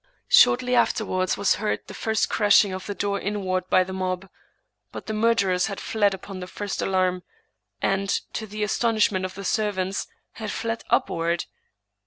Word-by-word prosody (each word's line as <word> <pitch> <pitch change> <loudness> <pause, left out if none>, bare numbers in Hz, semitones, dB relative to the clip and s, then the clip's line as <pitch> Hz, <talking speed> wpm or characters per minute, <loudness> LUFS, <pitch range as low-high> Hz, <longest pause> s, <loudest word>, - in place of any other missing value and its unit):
Shortly 250 0 +5
afterwards 185 -6 +1
was 200 - +2
heard 215 - -1
the - - -10
first 220 -1 0
crashing 205 -2 +4
of 185 0 -6
the 205 - -4
door 200 0 -1
inward 185 -3 -2
by 185 - +5
the 190 +1 -7
mob; 185 0 -3 0.6
but - - -8
the 220 - -4
murder 215 -3 +2
ers 180 +2 +1
had 200 -2 -5
fled 205 -3 +1
upon 190 0 -9
the 180 - -6
first 205 +1 -4
alarm, 185 -1 +1 0.6
and, 195 0 +1 0.2
to 220 - -4
the 210 +1 -4
astonishment 210 -3 +1
of 185 - -6
the 195 0 -7
servants, 195 -2 -1 0.2
had 215 -2 -6
fled 230 +2 -3
upward. 170 +1 +1
195 Hz, 170 wpm, -24 LUFS, 185-215 Hz, 0.6 s, Shortly